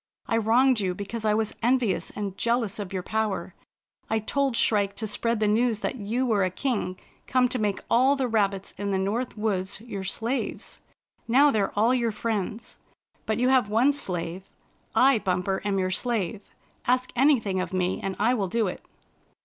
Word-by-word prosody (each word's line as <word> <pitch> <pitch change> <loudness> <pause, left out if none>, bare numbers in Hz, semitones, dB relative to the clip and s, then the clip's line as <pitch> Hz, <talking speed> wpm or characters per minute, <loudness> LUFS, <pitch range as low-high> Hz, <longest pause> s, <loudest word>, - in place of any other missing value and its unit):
I 225 - 0
wronged 240 +3 +4
you 185 -3 -1
because 215 +3 -5
I 210 -1 +3
was 220 -1 -1
envious 240 -3 +1
and 200 -2 -4
jealous 230 -1 0
of 200 -3 -5
your 185 -2 -3
power. 210 -4 -2 0.6
I 220 - +2
told 265 +3 0
Shrike 200 -2 +2
to 215 +2 -4
spread 230 +2 -1
the 215 - +2
news 220 0 +2
that - - -1
you 235 +4 -1
were 215 -5 +2
a 185 - +1
king 185 -3 -2 0.3
come 255 -1 +3
to 250 - -2
make 205 -2 -1
all 260 +4 +4
the 265 -2 -1
rabbits 200 -4 0
in 205 0 -2
the 195 - +1
North 215 +6 -2
Woods 200 -2 -1
your 210 -4 -6
slaves. 230 +7 -3 0.5
Now 275 +5 +5
they're 205 -4 0
all 225 +4 +4
your 235 -3 +1
friends. 215 0 -4 0.5
But 220 - 0
you 250 +1 +2
have 255 -5 +3
one 240 +7 +3
slave. 180 -7 -3 0.5
I, 265 -2 +5
Bumper, 190 -1 -1
am 200 -1 0
your 185 -1 0
slave. 210 -3 -1 0.5
Ask 255 +1 +1
anything 240 -8 +3
of - - -4
me, 185 -1 -1
and 195 -1 -3
I 230 +4 +3
will 205 -6 0
do 225 +4 0
it." 185 - -5
215 Hz, 185 wpm, -26 LUFS, 195-240 Hz, 0.6 s, Now